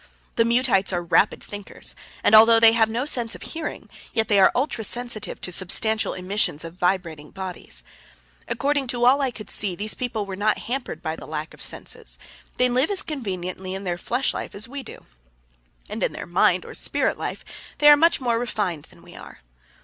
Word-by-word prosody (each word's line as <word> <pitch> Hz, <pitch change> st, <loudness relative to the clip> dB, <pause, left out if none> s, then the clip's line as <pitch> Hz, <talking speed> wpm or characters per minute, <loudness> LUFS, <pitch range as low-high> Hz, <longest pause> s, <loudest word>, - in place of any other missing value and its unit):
The 230 Hz, -, +3 dB
Muteites 235 Hz, -5 st, +3 dB
are 175 Hz, -1 st, -1 dB
rapid 175 Hz, +4 st, +2 dB
thinkers, 205 Hz, -1 st, -7 dB, 0.3 s
and -, -, +3 dB
although 225 Hz, +1 st, +9 dB
they 225 Hz, 0 st, +8 dB
have 225 Hz, -1 st, +3 dB
no 235 Hz, +4 st, -2 dB
sense 240 Hz, -6 st, -1 dB
of -, -, -10 dB
hearing, 325 Hz, -1 st, -5 dB, 0.3 s
yet 225 Hz, -2 st, 0 dB
they 205 Hz, -2 st, +4 dB
are 190 Hz, -, +6 dB
ultra 245 Hz, -3 st, -1 dB
sensitive 240 Hz, -1 st, -2 dB
to 180 Hz, -, -3 dB
substantial 215 Hz, +5 st, +2 dB
emissions 185 Hz, -4 st, 0 dB
of 165 Hz, 0 st, -8 dB
vibrating 175 Hz, -4 st, -1 dB
bodies. 185 Hz, -, -5 dB, 0.6 s
According 280 Hz, +1 st, 0 dB
to 240 Hz, -1 st, 0 dB
all 270 Hz, +3 st, +5 dB
I 270 Hz, -, +1 dB
could 215 Hz, -3 st, -8 dB
see, 195 Hz, -4 st, 0 dB
these 210 Hz, +4 st, -1 dB
people 225 Hz, -5 st, -3 dB
were 195 Hz, -1 st, -6 dB
not 210 Hz, +2 st, +1 dB
hampered 255 Hz, +2 st, -5 dB
by 160 Hz, -1 st, -2 dB
this -, -, -11 dB
lack 155 Hz, 0 st, -5 dB
of -, -, -11 dB
senses. -, -, -5 dB, 0.4 s
They 250 Hz, -, +4 dB
live 255 Hz, +4 st, +1 dB
as 405 Hz, -1 st, +4 dB
conveniently 190 Hz, -, -5 dB
in 195 Hz, -, -6 dB
their 175 Hz, -2 st, -3 dB
flesh 250 Hz, +7 st, 0 dB
life -, -, -6 dB
as 210 Hz, +3 st, -3 dB
we 275 Hz, +3 st, -6 dB
do, 255 Hz, -, -12 dB, 0.8 s
and -, -, -6 dB
in -, -, 0 dB
their -, -, -6 dB
mind 175 Hz, +1 st, +2 dB
or -, -, -9 dB
spirit -, -, 0 dB
life -, -, -6 dB, 0.3 s
they 295 Hz, -, +4 dB
are 295 Hz, -, +11 dB
much 330 Hz, +3 st, +3 dB
more 240 Hz, -3 st, 0 dB
refined 205 Hz, -10 st, -2 dB
than -, -, -19 dB
we -, -, -15 dB
are. -, -, -12 dB
220 Hz, 200 wpm, -23 LUFS, 185-245 Hz, 0.8 s, are